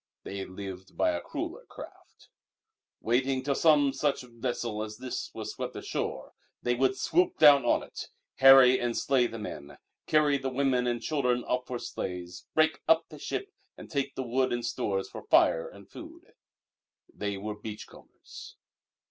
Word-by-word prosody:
They 100 0 -5
lived 95 0 -9
by - - +3
a 85 0 -3
crueller - - -6
craft. - - -13 0.7
Waiting 130 +3 +1
till 140 +1 0
some 145 -2 +4
such 145 -3 0
vessel 120 -2 -4
as 110 0 -6
this 130 0 -5
was - - -5
swept - - -6
ashore, - - -4 0.3
they 120 - 0
would 130 +1 +1
swoop 180 +3 +1
down 145 -4 +7
on - - +2
it, - - -8 0.3
harry 135 -1 +8
and 120 -1 -1
slay 130 -3 +2
the 115 - -8
men, 75 -9 -8 0.3
carry 150 -2 +3
the 135 0 -2
women 130 -2 +1
and 120 -1 -2
children 125 -2 0
off 125 0 -2
for 125 - -3
slaves, 90 -5 -6
break 155 0 +3
up 165 0 +3
the 150 - -11
ship 400 - -4 0.3
and - - -12
take 140 -3 -2
the 130 - -3
wood 130 +2 0
and 120 -1 -2
stores 95 -4 -2
for - - -9
fire 80 - +4
and 100 -1 -15
food. - - -13 0.8
They 100 -1 -3
were 105 +2 -4
beach 105 0 -8
combers. - - -14
125 Hz, 165 wpm, -29 LUFS, 105-135 Hz, 0.8 s, harry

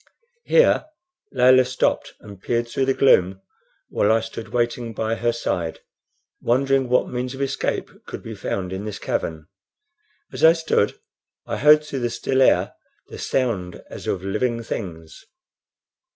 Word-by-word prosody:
Here 480 -9 +4 0.5
Layelah 130 0 +5
stopped 130 0 -1
and 100 -2 -12
peered 120 0 -1
through 130 +3 -1
the 135 0 +1
gloom 95 -8 +4 0.5
while 105 - +2
I 115 0 +3
stood 115 0 -7
waiting 120 -1 -2
by 110 +1 -1
her 120 +1 0
side, 90 -8 -3 0.6
wondering 135 +1 +1
what 125 - +2
means 125 +1 -4
of 135 - -7
escape 135 0 -2 0.2
could - - -7
be - - -7
found 95 -1 -4
in 95 +2 -5
this 105 - -5
cavern. 80 -2 -3 0.9
As - - -5
I 160 +1 +9
stood 160 -10 0 0.5
I - - -3
heard 150 +2 +6
through 140 -3 -5
the 120 -1 -1
still 130 +3 -1
air - - +3 0.4
the - - -9
sound 105 -9 -2
as - - -8
of 95 - -2
living 115 +4 -1
things. 80 -8 -7
120 Hz, 150 wpm, -22 LUFS, 100-130 Hz, 0.9 s, I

